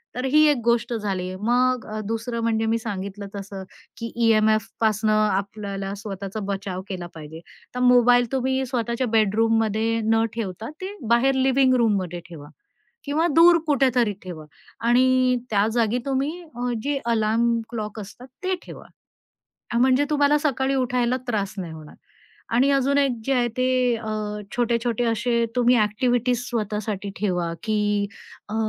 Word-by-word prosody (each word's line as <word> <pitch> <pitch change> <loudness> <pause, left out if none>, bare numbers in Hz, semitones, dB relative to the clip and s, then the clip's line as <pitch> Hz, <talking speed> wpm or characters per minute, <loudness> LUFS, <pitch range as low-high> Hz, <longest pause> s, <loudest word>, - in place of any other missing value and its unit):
तर 250 +1 -3
ही 305 +2 +6
एक 290 - +2
गोष्ट 235 +1 +1
झाली. 195 -5 -2
मग 250 +2 +1
अ, 215 - -3
दुसरं 230 +1 -3
म्हणजे 225 -1 +1
मी 225 +1 +2
सांगितलं 200 -2 -5
तसं, 195 -1 -7 0.3
की 230 0 -5
ई-एम-एफपासनं 215 -1 +2
आपल्याला 200 -1 -1
स्वतःचा 200 0 -6
बचाव 195 -2 -4
केला 180 -3 -5
पाहिजे. 160 +1 -9 0.3
तर - - -2
मोबाईल 245 0 +5
तुम्ही 265 0 0
स्वतःच्या 240 0 -2
बेडरूममध्ये 225 +1 +1
न 225 0 +3
ठेवता, 220 -1 -5
ते 385 +2 -5
बाहेर 250 +3 +3
लिविंग 265 0 +3
रूममध्ये 200 -7 0
ठेवा. 150 -4 -10 0.6
किंवा 300 +4 +1
दूर 340 +1 +7
कुठेतरी 255 -6 +2
ठेवा. 175 -4 -8 0.4
आणि 255 +1 +4
त्या 205 -1 +3
जागी 230 0 +1
तुम्ही 275 +2 0
अ, 245 -7 -5
जे 285 0 0
अलार्म 230 +1 +2
क्लॉक 215 -2 -5
असतात 215 +5 -11 0.2
ते 375 0 +1
ठेवा. - - -11 0.9
म्हणजे 260 +2 +4
तुम्हाला 290 0 +3
सकाळी 275 -2 0
उठायला 250 -1 +1
त्रास 210 -3 -1
नाही 175 -4 -5
होणार. 155 -1 -11 0.6
आणि 260 +4 +4
अजून 275 0 +2
एक 275 -2 +3
जे 275 - +1
आहे 245 -1 +2
ते 255 -1 +2
अ, 225 0 -8 0.5
छोटे-छोटे 235 0 0
असे 235 +1 +1
तुम्ही 245 0 +4
ॲक्टिव्हिटीज 245 +3 +1
स्वतःसाठी 210 -3 -3
ठेवा 180 -4 -1
की 220 -1 0 0.8
अ, - - -4
230 Hz, 140 wpm, -23 LUFS, 210-255 Hz, 0.9 s, दूर